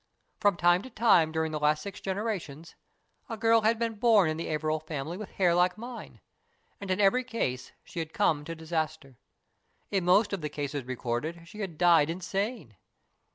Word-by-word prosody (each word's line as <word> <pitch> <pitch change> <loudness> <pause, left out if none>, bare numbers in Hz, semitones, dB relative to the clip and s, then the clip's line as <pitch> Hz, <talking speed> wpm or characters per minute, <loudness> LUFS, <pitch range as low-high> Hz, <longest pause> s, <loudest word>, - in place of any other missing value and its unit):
From 205 -4 +3
time 175 +1 +4
to 260 - -10
time 210 -9 +4
during 160 0 -1
the 155 - -3
last 150 +1 +2
six 200 0 -8
generations 190 -6 -4 0.6
a 225 - -4
girl 225 +1 +4
had 220 +2 +2
been 230 0 -1
born 210 -8 +5
in 155 - -4
the 165 - -4
Averil 155 0 -1
family 155 +1 -5
with 210 +1 -7
hair 180 -3 +3
like 180 +2 +2
mine, 240 +2 -9 0.6
and 200 - -7
in 185 +1 0
every 210 +6 +4
case 180 - -3
she 170 - -7
had 160 -1 -4
come 160 -7 +1
to 165 - -5
disaster. 155 -5 -4 0.7
In 195 -3 +1
most 200 +4 +4
of 195 - -2
the 150 - -3
cases 145 -2 -4
recorded 130 +7 -4
she 210 +4 -12
had 190 -7 -5
died 170 -3 +5
insane. 185 - -3
175 Hz, 185 wpm, -28 LUFS, 155-205 Hz, 0.7 s, born